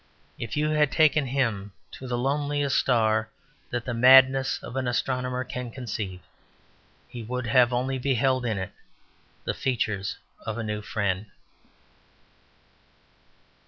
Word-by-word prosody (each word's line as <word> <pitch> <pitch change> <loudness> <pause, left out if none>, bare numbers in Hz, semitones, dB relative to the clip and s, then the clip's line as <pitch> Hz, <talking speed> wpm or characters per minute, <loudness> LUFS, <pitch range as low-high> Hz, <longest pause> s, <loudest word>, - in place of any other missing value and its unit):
If 115 +4 -4
you 150 +1 +1
had 150 -2 +3
taken 150 -2 +3
him 115 -7 -1 0.2
to 130 - -9
the 120 -1 -1
loneliest 145 +2 0
star 110 -3 +2 0.4
that 120 -1 -3
the 125 - -2
madness 130 +2 +6
of - - -8
an 130 -1 -1
astronomer 125 +1 -1
can 125 -1 -6
conceive, 105 -7 -5 0.9
he 120 -1 -8
would 125 +3 -4
have 120 +1 +4
only 130 +2 -1
beheld 130 0 +1
in 110 -4 -1
it 95 -1 -4 0.7
the - - -2
features 105 -6 -2 0.3
of 110 0 -4
a 115 - -3
new 105 -1 -3
friend. 100 -1 -2
125 Hz, 130 wpm, -26 LUFS, 110-135 Hz, 0.9 s, madness